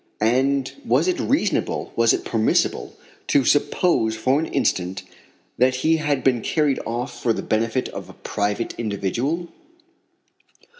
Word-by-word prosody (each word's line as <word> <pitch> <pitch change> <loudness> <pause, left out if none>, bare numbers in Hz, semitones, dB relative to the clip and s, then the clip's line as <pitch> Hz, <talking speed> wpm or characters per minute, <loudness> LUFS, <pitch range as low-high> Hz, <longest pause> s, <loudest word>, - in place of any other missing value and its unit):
And 130 +4 +1
was - - +2
it 360 -1 0
reasonable, 260 -7 0
was 115 -1 +4
it - - -1
permissible, 110 -1 0 0.3
to 140 -3 +3
suppose 145 -5 +2
for 130 +6 +1
an 160 - -2
instant 90 +1 -1 0.6
that 130 +1 +4
he 160 0 +4
had 145 -3 -1
been 125 -3 +2
carried 150 -1 +1
off 120 +3 -4
for 115 - +2
the - - -4
benefit 115 +4 0
of - - -8
a - - -11
private 105 +2 -2
individual? 120 - -2
130 Hz, 140 wpm, -22 LUFS, 110-145 Hz, 0.6 s, was